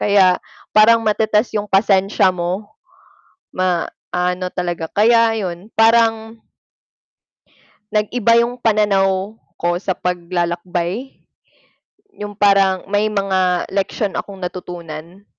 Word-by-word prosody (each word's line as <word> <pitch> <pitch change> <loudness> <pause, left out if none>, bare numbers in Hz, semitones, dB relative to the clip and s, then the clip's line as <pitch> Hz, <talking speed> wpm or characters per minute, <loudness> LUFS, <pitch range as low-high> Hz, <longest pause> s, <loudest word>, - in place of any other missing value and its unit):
Kaya 190 -3 +4 0.3
parang 225 +1 +5
matetest 215 +1 +1
'yong 205 0 -3
pasensya 195 -1 +3
mo, 185 +4 -4 0.8
maano 180 0 -2
talaga 175 -2 -3
kaya 230 +1 +4
'yon 185 +1 -6
parang 225 0 +3 1.5
nag-iba 230 +2 +2
yung 240 +1 -1
pananaw 205 -3 +1 0.2
ko 175 0 0
sa 190 +1 -2
paglalakbay. 175 +5 -3 1.1
Yung 205 -1 -6
parang 195 -2 +3
may 205 +2 0
mga 190 -3 0
leksyon 195 +1 -1
akong 200 -1 -5
natutunan. 175 +1 -8
195 Hz, 95 wpm, -18 LUFS, 180-215 Hz, 1.5 s, parang